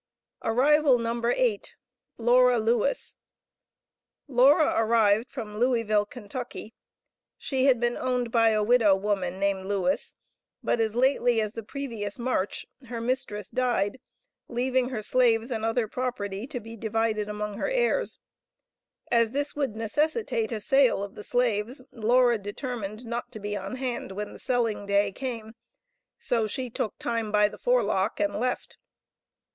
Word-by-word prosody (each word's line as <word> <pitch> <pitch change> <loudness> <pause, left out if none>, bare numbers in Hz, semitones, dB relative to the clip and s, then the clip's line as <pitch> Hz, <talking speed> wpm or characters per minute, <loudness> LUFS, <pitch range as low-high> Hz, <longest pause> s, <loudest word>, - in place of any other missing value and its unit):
Arrival 275 +3 +4
No. 235 0 -2
8. 470 - 0 0.4
Laura 245 +1 +4
Lewis. 230 +4 0 1.1
Laura 280 +4 +5
arrived 225 0 +3
from 215 -6 -7
Louisville, 230 -4 +2
Kentucky. 240 0 -7 0.6
She 265 -2 -1
had 260 -4 +4
been 240 0 0
owned 250 -2 -1
by 230 -1 +4
a 215 -1 +2
widow 220 -3 +5
woman 190 -2 -1
named 195 -1 0
Lewis, 205 +8 -1 0.5
but - - +1
as 220 0 0
lately 245 -2 +3
as 215 -1 -1
the 230 - -5
previous 220 -4 -5
March 235 -6 -2 0.2
her 235 0 -5
mistress 230 -4 -3
died, 245 -3 0 0.5
leaving 255 +1 0
her 230 -5 -4
slaves 235 0 +2
and 220 -2 -2
other 225 0 +1
property 215 -3 -4
to 275 -4 -5
be 225 0 -10
divided 220 -1 -1
among 210 0 -4
her - - -1
heirs. - - 0 0.9
As 230 0 +3
this 285 +1 -2
would 275 -7 -1
necessitate 230 - -1
a 225 - -2
sale 260 -2 +3
of 200 - -7
the 210 - -9
slaves, 245 +1 0
Laura 240 +1 +3
determined 215 +1 -5
not 235 +1 -4
to 215 - -7
be 205 0 -4
on 195 +4 -5
hand 250 -6 -4
when 210 +2 -5
the - - -12
selling 230 -6 -1
day 200 0 +2
came, 230 -2 -6 0.6
so 230 -4 0
she 250 +3 -4
took 220 - -3
time 230 -2 -2
by 210 0 +4
the - - -11
forelock 355 - +1
and 205 0 0
left. 250 +1 -3
230 Hz, 145 wpm, -27 LUFS, 210-255 Hz, 1.1 s, Laura